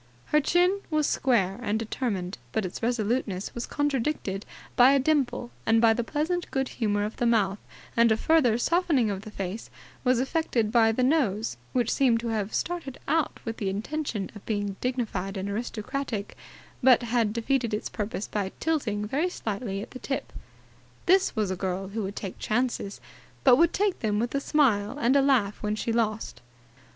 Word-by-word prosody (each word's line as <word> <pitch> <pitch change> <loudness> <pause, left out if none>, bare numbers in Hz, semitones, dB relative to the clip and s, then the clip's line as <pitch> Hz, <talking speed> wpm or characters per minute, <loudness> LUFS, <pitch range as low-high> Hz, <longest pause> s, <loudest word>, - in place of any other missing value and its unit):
Her 300 - +6
chin 360 +6 +2
was 305 -2 +2
square 210 -8 +1
and 215 -2 0
determined, 210 - -3
but 220 - 0
its 180 - -6
resoluteness 225 -4 -1
was 235 - -4
contradicted 270 -8 -1 0.3
by 250 +3 +7
a 280 - +4
dimple 255 -4 0
and 225 0 +4
by 225 -1 +6
the 240 +1 -1
pleasant 315 +8 -2
good 265 -1 -1
humour 205 -3 0
of 215 - -6
the 240 - +1
mouth; 205 -4 +2 0.4
and 235 -1 +5
a 220 - +3
further 255 -6 +3
softening 295 - +2
of 195 -1 -4
the 215 - -9
face 195 +1 -5 0.3
was 250 -1 +3
effected 260 -6 0
by 225 -2 +5
the 250 +3 0
nose, 235 - +1 0.2
which 245 -2 +1
seemed 245 -4 +3
to 235 - -3
have 215 -2 -1
started 335 -7 -3
out 320 -2 +1
with 225 -1 -4
the 200 - -1
intention 220 +1 -3
of 210 - -11
being 205 -2 -1
dignified 215 -6 -2
and 190 +1 -3
aristocratic 225 0 -4 0.5
but 255 -1 +6
had 230 -2 +1
defeated 235 +1 0
its 210 - -2
purpose 210 0 -4
by 200 -2 -2
tilting 245 -10 0
very 295 +11 0
slightly 205 - -4
at - - -11
the 255 - -8
tip. 270 - -4 0.7
This 380 +1 +4
was 210 -4 0
a - - -1
girl 190 +1 -3
who 220 +2 -3
would 200 0 -4
take 195 -3 -6
chances, 235 -3 -1 0.4
but 255 -2 +8
would 335 +2 +4
take 405 -1 0
them 210 -2 0
with 235 +3 -1
a 280 - +1
smile 260 -6 +2
and 255 -2 +3
laugh 220 -7 +2
when 210 0 -1
she 225 +1 -2
lost. 215 - -1
230 Hz, 180 wpm, -27 LUFS, 210-270 Hz, 0.7 s, but